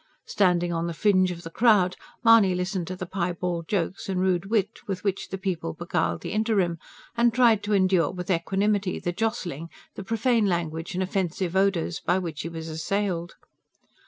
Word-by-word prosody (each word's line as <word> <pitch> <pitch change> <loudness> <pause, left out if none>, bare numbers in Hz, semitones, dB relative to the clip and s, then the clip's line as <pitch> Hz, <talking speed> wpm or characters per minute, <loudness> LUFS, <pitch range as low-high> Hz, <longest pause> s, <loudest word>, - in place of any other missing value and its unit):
Standing 175 -3 +2
on 165 0 -1
the 170 - -4
fringe 185 -1 +3
of 175 -1 -6
the 165 - -8
crowd, 205 -4 +4 0.3
Mahony 225 -5 +6
listened 180 -1 -2
to 185 - -4
the 185 - -5
piebald 175 -2 -3
jokes 195 +1 -2
and 185 -1 -1
rude 185 0 +1
wit 210 0 0
with 190 -2 -4
which 195 -2 -2
the 190 - -4
people 185 - -3
beguiled 85 -1 -1
the - - -5
interim; 205 -6 +1 0.4
and 235 0 +4
tried 230 -3 +4
to 205 0 -2
endure 185 -5 +3
with 180 +2 -4
equanimity 195 +2 0
the 175 - -2
jostling, 175 - -3 0.2
the 195 - -7
profane 225 +1 +1
language 170 -1 -2
and 185 - 0
offensive 185 -1 -2
odours, 190 -4 +1
by 175 - +1
which 165 -4 -4
he 165 - -5
was 165 -1 -7
assailed. 175 +2 -2
185 Hz, 180 wpm, -26 LUFS, 170-200 Hz, 0.4 s, Mahony